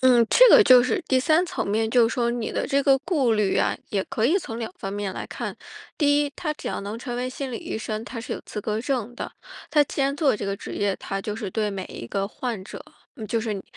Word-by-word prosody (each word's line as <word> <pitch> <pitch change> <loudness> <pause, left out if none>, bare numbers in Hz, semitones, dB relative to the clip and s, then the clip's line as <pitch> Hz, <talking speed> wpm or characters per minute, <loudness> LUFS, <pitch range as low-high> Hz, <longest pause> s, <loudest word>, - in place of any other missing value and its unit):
嗯， 245 -3 +5
这 - - +7
个 440 - +9
就 255 -5 +7
是 255 - 0
第 260 - +4
三 315 +6 +3
层 - - -3
面 220 +2 0
就 240 -2 +5
是 - - -4
说 235 -1 +1
你 235 -2 -3
的 - - -1
这 280 0 +2
个 270 -1 +4
顾 280 -6 +1
虑 210 -3 +1
啊， - - +2
也 195 -2 -1
可 235 -4 0
以 330 - +3
从 230 -9 -6
两 225 -4 -4
方 195 0 -5
面 205 -2 -3
来 - - -5
看。 - - -5 0.4
第 290 -1 +3
一， 290 -1 -1
他 305 -3 -2
只 - - -6
要 - - -3
能 205 +3 -5
成 240 -1 -5
为 250 +1 -2
心 270 0 -5
理 235 - -3
医 - - -5
生， 220 0 -4
他 235 -1 -6
是 245 - -5
有 - - -7
资 210 - -5
格 215 +1 -2
证 245 -3 -2
的， - - -6 0.4
他 300 - +5
既 275 - -2
然 275 +1 +1
做 290 -6 +2
这 205 - -5
个 195 - -1
职 - - -7
业， 200 -1 0
他 195 0 -4
就 210 - -3
是 210 -3 -5
对 210 +1 -1
每 190 -2 -4
一 115 - -8
个 195 +8 -2
患 225 -3 -4
者 - - -9 0.4
就 230 +1 0
是 220 -2 -2
你 195 - -6
235 Hz, 290 characters per minute, -24 LUFS, 210-270 Hz, 0.4 s, 个